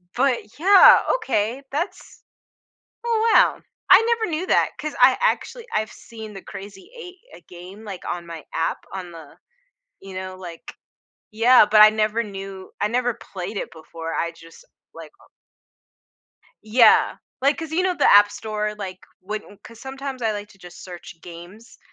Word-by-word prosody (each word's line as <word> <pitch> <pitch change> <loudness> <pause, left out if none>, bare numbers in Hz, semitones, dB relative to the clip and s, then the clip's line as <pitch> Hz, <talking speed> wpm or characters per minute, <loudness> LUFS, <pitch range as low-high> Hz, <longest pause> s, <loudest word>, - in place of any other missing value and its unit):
But, 255 -1 +2 0.2
yeah, 390 +3 +8 0.2
okay, 245 - -2
that's 360 +6 -5 0.8
Oh, 460 -1 +1
wow. - - +4 0.3
I 375 +4 +9
never 445 -7 -3
knew 340 +4 -3
that, - - +2
'cause 305 -1 -4
I, 255 +1 +7
actually - - -1
I've 215 0 -1
seen 220 -2 -11
the 195 - -9
Crazy 195 -1 -11
Eight, 365 -4 -10 0.2
uh, - - -14
game, 185 +4 -12
like, 195 -4 -8
on 175 -1 -4
my 165 -2 -9
app, 165 0 -1
on 185 -2 -7
the, 160 -4 -13 0.7
you 195 -1 -11
know, 185 0 -6
like 175 -3 -10 0.6
Yeah, 230 +3 +6
but 215 - +6
I 215 - +9
never 215 +1 0
knew 195 -1 -9
I 210 - +1
never 245 0 0
played 195 +1 -8
it - - -4
before. 165 0 -8
I 170 0 -2
just 165 - -17 0.3
like, - - -11
uh - - -23 1.3
Yeah. 220 +1 +4 0.3
Like, 280 +2 +2
'cause 320 -1 -6
you 360 - +1
know, 370 -1 0
the - - +3
App 205 0 +7
Store, 210 0 -4
like, 190 -3 -7 0.2
when 205 +1 -7
'cause 230 -1 -14
sometimes 270 -1 -7
I 220 - +1
like 205 0 -6
to 195 - -20
just 180 -2 -13
search 175 -2 -11
games 175 +6 -13
210 Hz, 165 wpm, -22 LUFS, 185-260 Hz, 1.3 s, I